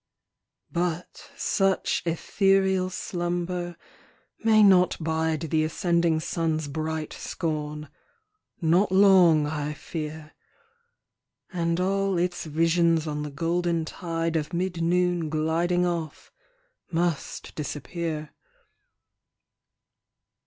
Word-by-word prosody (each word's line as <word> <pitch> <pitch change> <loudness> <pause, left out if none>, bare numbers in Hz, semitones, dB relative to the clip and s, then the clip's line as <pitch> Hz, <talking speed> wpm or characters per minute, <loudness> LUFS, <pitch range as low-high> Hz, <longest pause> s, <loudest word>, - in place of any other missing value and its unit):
But 175 0 -3
such 195 -1 +1
ethereal 190 +2 +2
slumber 175 -1 -3 0.7
may 220 -1 +6
not 185 -3 +5
bide 160 -1 -1
The 160 -1 +1
ascending 170 0 +1
sun's 160 -2 -1
bright 155 +1 -3
scorn 150 -2 -4 0.7
not 175 +4 +3
long, 185 -5 +6
I 150 0 -3
fear; 155 -1 -6 1.2
And 170 -1 0
all 195 0 +1
its 175 0 -1
visions 165 +1 +2
on 150 -1 -3
the 150 - -4
golden 170 +2 -1
tide 165 -1 -3
Of 155 +2 -2
mid 175 -1 -2
noon 175 -1 +1
gliding 165 +3 +1
off, 170 -4 -4 0.6
must 170 -2 -2
disappear. 155 +2 -4
170 Hz, 90 wpm, -26 LUFS, 155-180 Hz, 1.2 s, may